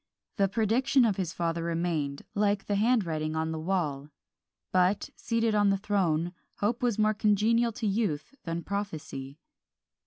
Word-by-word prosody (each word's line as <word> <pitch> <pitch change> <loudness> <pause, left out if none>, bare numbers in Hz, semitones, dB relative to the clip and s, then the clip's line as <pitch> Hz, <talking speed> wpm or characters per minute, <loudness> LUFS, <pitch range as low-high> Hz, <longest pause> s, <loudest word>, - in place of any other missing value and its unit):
The 200 -2 +4
prediction 235 +5 +3
of 210 -4 +1
his 180 -4 -2
father 170 0 -1
remained, 165 -4 -1
like 205 -1 +1
the 205 - -1
handwriting 185 -9 +1
on 160 0 -1
the 160 - -3
wall; 155 -5 -1 0.6
but, 185 +2 +2
seated 230 -1 0
on 205 -1 +4
the 195 - +2
throne, 175 -4 0 0.2
Hope 225 +4 -1
was 240 -4 +1
more 215 0 +3
congenial 220 +3 +2
to 220 - -4
youth 200 - -1
than 165 0 -3
Prophecy. 155 -9 -5
195 Hz, 150 wpm, -29 LUFS, 165-215 Hz, 0.6 s, The